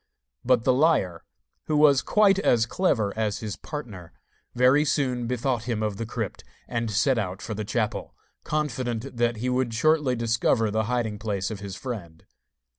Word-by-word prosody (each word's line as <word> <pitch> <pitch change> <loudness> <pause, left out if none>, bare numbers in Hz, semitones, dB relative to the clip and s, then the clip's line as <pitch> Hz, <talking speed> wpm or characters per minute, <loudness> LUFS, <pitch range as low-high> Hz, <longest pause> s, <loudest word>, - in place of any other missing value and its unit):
But 125 -2 +3
the 130 - +4
liar, 130 - +2 0.4
who 155 - 0
was 145 -3 +5
quite 200 -2 +4
as 120 - +3
clever 115 - 0
as 110 -2 -1
his 105 -2 -5
partner, 105 - -8 0.4
very 130 +4 +5
soon 130 -5 0
bethought 125 -1 -1
him 115 -3 -2
of 105 -2 -2
the 115 - -4
crypt, 110 -4 -4 0.2
and 115 -1 -2
set 115 +4 +2
out 95 -3 -3
for 110 - -5
the 110 +1 -4
chapel, 110 +1 -2 0.3
confident 130 -5 -3
that 120 0 +1
he 120 +4 -3
would 125 -2 0
shortly 150 0 +2
discover 115 -1 +1
the 110 0 0
hiding 110 -2 -1
place 100 -2 -2
of 105 - -5
his 100 -2 -7
friend. 95 -9 -7
115 Hz, 170 wpm, -25 LUFS, 105-130 Hz, 0.4 s, was